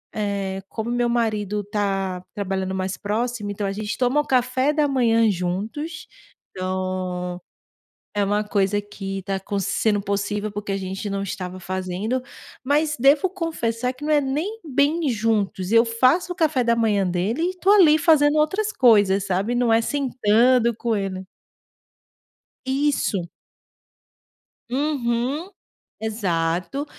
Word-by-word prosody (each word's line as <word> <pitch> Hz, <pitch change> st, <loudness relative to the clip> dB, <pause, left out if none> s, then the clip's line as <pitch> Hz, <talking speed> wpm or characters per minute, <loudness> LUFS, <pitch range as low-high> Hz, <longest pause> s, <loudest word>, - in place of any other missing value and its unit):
eh, 200 Hz, -2 st, -2 dB
como 225 Hz, +1 st, -4 dB
meu 240 Hz, 0 st, +1 dB
marido 215 Hz, -3 st, 0 dB
tá 195 Hz, -3 st, -2 dB
trabalhando 190 Hz, -1 st, -2 dB
mais 190 Hz, 0 st, -2 dB
próximo, 215 Hz, 0 st, -2 dB
então 205 Hz, 0 st, -3 dB
a 195 Hz, -, -2 dB
gente 210 Hz, +2 st, -4 dB
toma 255 Hz, +4 st, +2 dB
um -, -, -9 dB
café 255 Hz, +2 st, +2 dB
da 300 Hz, -1 st, +2 dB
manhã 230 Hz, -4 st, +3 dB
juntos, 210 Hz, -, -3 dB, 0.4 s
então, 185 Hz, -1 st, -3 dB, 0.7 s
é 205 Hz, -1 st, +1 dB
uma 205 Hz, +1 st, +1 dB
coisa 205 Hz, -1 st, 0 dB
que 195 Hz, -1 st, -6 dB
está 195 Hz, +1 st, -3 dB, 0.2 s
sendo 205 Hz, +2 st, +1 dB
possível, 205 Hz, +1 st, -2 dB
porque 205 Hz, 0 st, -4 dB
a -, -, 0 dB
gente 190 Hz, +2 st, -4 dB
não 195 Hz, 0 st, -2 dB
estava 185 Hz, -1 st, -5 dB
fazendo, 185 Hz, +7 st, -2 dB, 0.4 s
mas 300 Hz, +3 st, +1 dB
devo 280 Hz, +8 st, +4 dB
confessar 255 Hz, -9 st, -2 dB
que, 260 Hz, +3 st, -10 dB
não 305 Hz, -, +1 dB
é 295 Hz, -, +5 dB
nem 315 Hz, +12 st, -3 dB
bem 290 Hz, +3 st, +1 dB
juntos, 210 Hz, -4 st, 0 dB
eu 230 Hz, +1 st, +6 dB
faço 255 Hz, +10 st, +2 dB
o -, -, -9 dB
café 310 Hz, -7 st, +2 dB
da 235 Hz, 0 st, +3 dB
manhã 210 Hz, -4 st, +1 dB
dele 185 Hz, -, -1 dB
e 365 Hz, +2 st, -1 dB
tô 385 Hz, +2 st, +2 dB
ali 335 Hz, -7 st, +7 dB
fazendo 295 Hz, -1 st, +4 dB
outras 405 Hz, +8 st, +1 dB
coisas, 205 Hz, -, +4 dB
sabe. 195 Hz, +6 st, 0 dB
Não 240 Hz, -1 st, +2 dB
é 225 Hz, -, +5 dB
sentando 245 Hz, -2 st, +2 dB
com 230 Hz, -1 st, -1 dB
ele 190 Hz, -2 st, -3 dB, 1.4 s
Isso. 265 Hz, -8 st, 0 dB, 1.5 s
Uhum. 270 Hz, +3 st, -1 dB, 0.5 s
Exato, 190 Hz, -, -1 dB
225 Hz, 140 wpm, -23 LUFS, 195-270 Hz, 1.5 s, ali